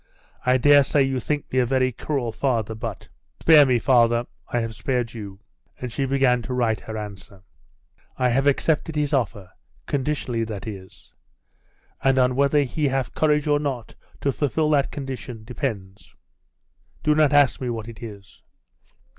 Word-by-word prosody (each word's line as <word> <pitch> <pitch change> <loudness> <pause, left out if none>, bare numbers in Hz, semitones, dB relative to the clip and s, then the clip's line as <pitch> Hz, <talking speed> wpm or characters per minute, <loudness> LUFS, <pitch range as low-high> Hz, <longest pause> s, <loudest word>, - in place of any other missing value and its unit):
'I 125 0 +5
daresay 145 +1 +5
you 135 -1 -1
think 145 +4 -3
me 130 - +3
a 125 - +3
very 130 0 +2
cruel 125 -1 -3
father; 115 -3 -1
but 110 - -6 0.2
' - - -44
'Spare 150 -3 +7
me, 125 -2 +3
father 120 -1 +3 0.2
I 120 - -1
have 115 -1 -4
spared 125 -2 -2
you.' 100 -4 -8 0.4
And 125 -2 -5
she 135 +5 -1
began 130 -2 +2
to 125 +2 -4
write 115 -3 +1
her 110 0 -7
answer. 100 -2 -9 0.7
'I 125 -1 +2
have 135 +4 +2
accepted 155 +2 +1
his 150 -1 0
offer 105 -8 -1 0.3
conditionally, 130 -4 -1
that 105 -3 -6
is. 95 -4 -10 0.9
And 135 0 +3
on 125 -1 +3
whether 140 +2 +3
he 145 +3 -1
have 135 -2 -1
courage 150 -1 +2
or 145 -1 +2
not 135 -6 -4 0.3
to 140 - +1
fulfil 150 +2 0
that 140 -2 +2
condition 130 -5 -6
depends 110 -6 -6 0.9
Do 150 - +3
not 150 -2 +3
ask 145 -3 +4
me 125 - -2
what 115 -2 -4
it 115 -2 -10
is. 100 -4 -11
130 Hz, 165 wpm, -23 LUFS, 115-140 Hz, 0.9 s, Spare